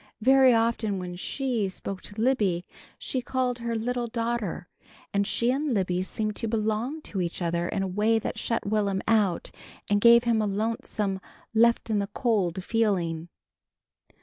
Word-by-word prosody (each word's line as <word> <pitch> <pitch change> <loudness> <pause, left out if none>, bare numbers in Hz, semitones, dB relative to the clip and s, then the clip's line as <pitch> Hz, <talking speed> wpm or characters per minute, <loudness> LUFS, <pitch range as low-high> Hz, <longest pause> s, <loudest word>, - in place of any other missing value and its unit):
Very 265 +1 +6
often 225 -3 +1
when 180 -1 -5
She 235 +1 -1
spoke 190 0 -6
to 205 +1 -10
Libby 210 -8 +1 0.3
she 260 - -3
called 250 -1 -1
her 235 0 -2
"little 240 +2 -1
daughter" 230 -6 -2 0.5
and 200 0 +1
she 235 +3 +1
and 275 -1 0
Libby 180 -2 0
seemed 215 +3 -3
to 230 - -2
belong 225 +7 -1
to 195 - -3
each 170 -1 -3
other 170 -1 -1
in 195 - -1
a - - -1
way 210 +4 +2
that 220 - -3
shut 230 - -1
Will'm 200 -2 0
out 210 -6 +2 0.4
and 205 0 +2
gave 235 +1 +7
him 230 -2 +2
a 210 - 0
lonesome 210 -2 -2 0.3
left 235 0 +3
in 210 - +2
the 200 - -1
cold 190 -7 0
feeling. 180 -7 0
215 Hz, 165 wpm, -27 LUFS, 195-235 Hz, 0.5 s, gave